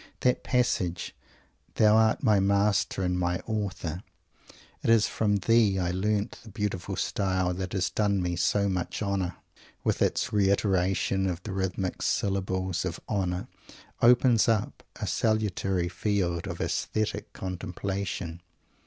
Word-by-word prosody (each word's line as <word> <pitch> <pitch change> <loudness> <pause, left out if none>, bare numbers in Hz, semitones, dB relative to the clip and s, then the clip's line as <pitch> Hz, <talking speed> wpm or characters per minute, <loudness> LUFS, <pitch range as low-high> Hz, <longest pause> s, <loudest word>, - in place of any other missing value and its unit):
That 125 - +2
passage, 90 -9 0 0.6
"Thou 110 -1 +5
art 110 +3 +3
my 105 -5 +4
master 100 0 +2
and 90 0 0
my 90 0 0
author. 95 -6 -3 0.8
It - - -1
is 115 -2 +5
from 105 -2 +1
thee 105 0 +3
I 90 -1 0
learnt 105 +3 -1
the 115 - -13
beautiful 105 -4 -3
style 95 -2 0
that 95 +1 -4
has 95 -2 0
done 100 -2 +1
me 90 -1 -1
so 100 +4 +2
much 95 +2 -2
honour," 95 -3 -1 0.5
with - - 0
its - - +1
reiteration 95 -1 +2
of 90 0 -4
the 105 - -5
rhythmic 95 -1 -2
syllables 95 -2 -1
of 90 -2 -4
"honour," 90 -3 -1 0.5
opens 120 -1 +5
up 110 -3 0
a - - -4
salutary 100 -5 0
field 90 -2 -1
of - - -5
aesthetic 110 -1 -2
contemplation. 90 -1 -4
95 Hz, 135 wpm, -28 LUFS, 90-105 Hz, 0.8 s, Thou